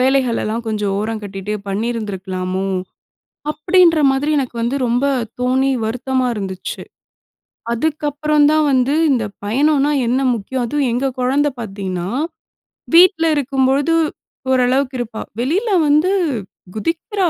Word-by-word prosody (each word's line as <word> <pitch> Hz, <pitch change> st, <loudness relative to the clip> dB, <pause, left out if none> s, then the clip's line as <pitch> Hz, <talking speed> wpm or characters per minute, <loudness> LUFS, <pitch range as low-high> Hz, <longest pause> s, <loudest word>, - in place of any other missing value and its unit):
வேலைகளெல்லாம் 245 Hz, -4 st, +1 dB
கொஞ்சம் 210 Hz, -2 st, -1 dB
ஓரம் 220 Hz, +1 st, -3 dB
கட்டிட்டு 200 Hz, 0 st, -5 dB, 0.2 s
பண்ணியிருந்திருக்கலாமோ, 195 Hz, -4 st, -3 dB, 0.8 s
அப்படின்ற 330 Hz, +2 st, +4 dB
மாதிரி 280 Hz, +3 st, 0 dB
எனக்கு 255 Hz, -3 st, -3 dB
வந்து 240 Hz, +4 st, 0 dB
ரொம்ப 245 Hz, +3 st, +1 dB, 0.4 s
தோணி 260 Hz, +2 st, +2 dB
வருத்தமா 255 Hz, +3 st, -1 dB
இருந்துச்சு. 190 Hz, -3 st, -5 dB, 0.9 s
அதுக்கு 300 Hz, +6 st, -1 dB
அப்புறம் 300 Hz, +1 st, +2 dB
தான் 310 Hz, 0 st, +3 dB
வந்து 260 Hz, +1 st, +2 dB, 0.2 s
இந்த 245 Hz, -4 st, +1 dB, 0.2 s
பயணம்னா 285 Hz, +6 st, +2 dB, 0.2 s
என்ன 255 Hz, +3 st, +1 dB
முக்கியம்? 240 Hz, +3 st, -3 dB
அதுவும் 280 Hz, +1 st, 0 dB
எங்க 250 Hz, +3 st, 0 dB
குழந்த 270 Hz, +4 st, +2 dB
பார்த்தீங்கனா, 195 Hz, -5 st, -4 dB, 0.9 s
வீட்ல 345 Hz, -1 st, +6 dB
இருக்கும் 270 Hz, -2 st, +1 dB
பொழுது 285 Hz, +5 st, +2 dB, 0.6 s
ஓரளவுக்கு 260 Hz, +1 st, +2 dB
இருப்பா. 225 Hz, -2 st, -4 dB, 0.2 s
வெளியில 345 Hz, -, 0 dB, 0.2 s
வந்து 305 Hz, +6 st, +3 dB, 0.6 s
குதிக்கிறா. 340 Hz, -, -1 dB
255 Hz, 115 wpm, -18 LUFS, 220-290 Hz, 0.9 s, வீட்ல